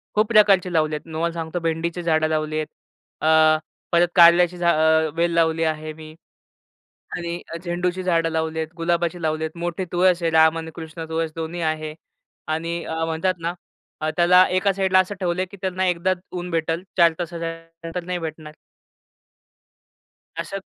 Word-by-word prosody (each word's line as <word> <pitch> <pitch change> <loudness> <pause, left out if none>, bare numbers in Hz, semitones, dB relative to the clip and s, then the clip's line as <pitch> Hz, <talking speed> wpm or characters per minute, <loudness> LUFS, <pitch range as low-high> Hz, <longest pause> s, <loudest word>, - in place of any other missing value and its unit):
खूप 215 +1 +3
प्रकारचे 195 -5 +4
लावले 155 -2 +1
आहेत. 150 - -6
तुम्हाला 165 +1 -1
सांगतो 165 +1 -4
भेंडीची 165 +2 -2
झाडं 160 -1 +2
लावली 155 0 -1
आहेत. 155 -1 -2 0.5
अ, 155 0 +5 0.3
परत 175 0 +4
कारल्याची 175 0 +6
झा 175 0 +2
अ, 160 0 +3
वेल 170 +1 +1
लावली 165 -1 +2
आहे 155 -1 -2
मी. 155 0 -12 1.0
आणि 170 0 -4
अ, - - -3
झेंडूची 180 +1 -2
झाडं 165 -2 +1
लावलीत, 160 0 -2
गुलाबाची 170 +1 -1
लावलीत, 160 0 -1
मोठी 175 +2 -3
तुळस 180 0 +3
आहे. 165 - +1
राम 160 0 +5
आणि 160 0 -6
कृष्ण 160 0 -7
तुळस 160 0 -2
दोन्ही 165 +1 -4
आहे. 155 -1 -7 0.5
आणि 165 +2 -2
अ, 160 0 -3
म्हणतात 165 +3 0
ना 170 +1 -2 0.5
अ, 155 - 0
त्याला 180 +1 +6
एका 185 +2 +2
साइडला 190 -1 +3
असं 185 +2 0
ठेवलं 180 -1 -1
आहे - - 0
की 200 - -11
त्यांना 185 0 -1
एकदाच 180 +1 +1 0.2
ऊन 180 0 -4
भेटेल, 165 +1 -1
4 170 -2 +6
तासाच्या 170 -1 -4 0.3
नंतर 165 +1 -5
नाही 180 0 -3
भेटणार. 155 -2 -7 1.8
अशाच 195 -1 -5
170 Hz, 165 wpm, -22 LUFS, 160-180 Hz, 1.8 s, कारल्याची